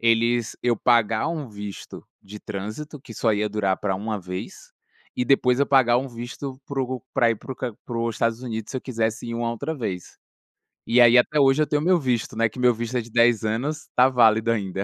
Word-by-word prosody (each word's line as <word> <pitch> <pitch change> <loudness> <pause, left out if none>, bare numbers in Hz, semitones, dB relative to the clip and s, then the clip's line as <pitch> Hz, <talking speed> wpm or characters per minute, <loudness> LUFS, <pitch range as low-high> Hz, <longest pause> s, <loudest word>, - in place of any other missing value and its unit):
eles 115 0 +2
eu 120 -1 +2
pagar 115 +1 +2
um 155 -5 -4
visto 105 -1 -8 0.2
de 105 +2 -11
trânsito, 110 +10 -6
que 130 -3 -12
só 115 - 0
ia 105 +1 0
durar 100 -2 0
pra 95 -2 -2
1 105 +2 -3
vez, 90 0 -8 0.4
e - - -1
depois 125 -1 +3
eu 140 - +3
pagar 125 -3 +4
um 135 +2 -4
visto 125 +3 -7
para 135 -1 -2
o 130 0 -4
para 120 -3 +3
ir 115 - -1
para 130 - -8
o - - -10
Can 130 - -4
para - - -25
ir - - -51
para 120 -2 -5
os 115 -1 -1
Estados 115 +2 -1
Unidos, 110 -3 -5
se - - -4
eu - - -12
quisesse 115 -4 -2
ir 115 - -4
uma 115 0 -1
outra 140 +7 -4
vez. 95 - -5 0.7
E 120 - +2
aí, 120 0 +7
até 150 +5 +3
hoje, 135 +1 +4
eu 155 - +2
tenho 145 +1 0
o - - -3
meu 185 0 +4
visto, 125 -9 -1
né, 115 0 +2
que 120 - -11
meu 125 -1 +4
visto 120 +2 -3
é - - 0
de 115 - -12
10 115 -1 +3
anos, 130 +8 -2
tá 125 +1 +6
válido 115 -3 +4
ainda. 100 -3 -2
120 Hz, 245 wpm, -24 LUFS, 110-130 Hz, 0.7 s, aí